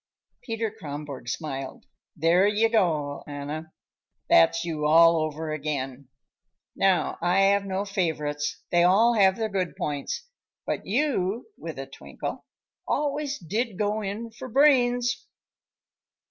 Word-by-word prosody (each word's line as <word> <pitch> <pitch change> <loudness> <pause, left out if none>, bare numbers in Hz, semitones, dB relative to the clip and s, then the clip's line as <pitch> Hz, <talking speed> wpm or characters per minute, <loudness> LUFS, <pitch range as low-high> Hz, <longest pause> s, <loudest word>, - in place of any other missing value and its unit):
Peter 225 -3 -3
Kronborg 145 - -7
smiled. 135 -4 -5 0.3
"There 170 +5 +4
you 215 +2 +2
go, 155 -10 0
Anna. 150 +2 -6 0.6
That's 165 - +5
you 155 -3 -1
all 165 +2 +6
over 155 0 -2
again. 140 -3 -4 0.7
Now, 195 -2 +1
I 175 +3 +3
have 200 0 +3
no 195 +1 -2
favorites; 150 -6 -2
they 175 - +4
all 200 +7 +5
have 195 -4 +4
their 220 0 -1
good 190 -4 -2
points. 145 - -4 0.4
But - - -3
you," 230 -3 0
with - - -7
a - - -5
twinkle, - - -7 0.4
"always 290 0 -1
did 210 +4 -3
go 210 +1 0
in 215 +3 -5
for 240 +3 -9
brains." 245 -2 +3
185 Hz, 125 wpm, -26 LUFS, 155-225 Hz, 0.7 s, all